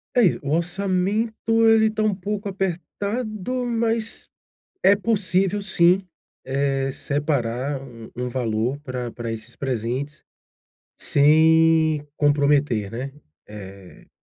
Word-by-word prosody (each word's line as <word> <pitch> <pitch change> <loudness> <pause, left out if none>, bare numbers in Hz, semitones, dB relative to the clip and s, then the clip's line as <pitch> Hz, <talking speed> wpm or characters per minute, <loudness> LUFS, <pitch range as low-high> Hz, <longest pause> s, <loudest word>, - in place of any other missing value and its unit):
É 245 - +5
isso, 190 -7 +3
o 140 - -3
orçamento 190 +5 0 0.3
ele 220 0 +5
tá 215 0 -2
um 215 -1 +2
pouco 205 +2 -4
apertado, 200 +6 -3
mas 230 -1 -2 0.5
é 200 - +6
possível 195 -2 +1
sim, 185 -1 +3 0.4
eh, 135 0 0
separar 140 -2 -2
um 120 -4 -11
um 125 +1 -3
valor 120 0 -1
pra 125 -4 -5
pra 120 -1 -5
esses 110 -1 -7
presentes 130 +3 -4 0.7
sem 160 +1 +4
comprometer, 145 -7 +2
né, 130 +4 -5 0.3
eh. 100 -3 -12
155 Hz, 110 wpm, -23 LUFS, 130-200 Hz, 0.7 s, é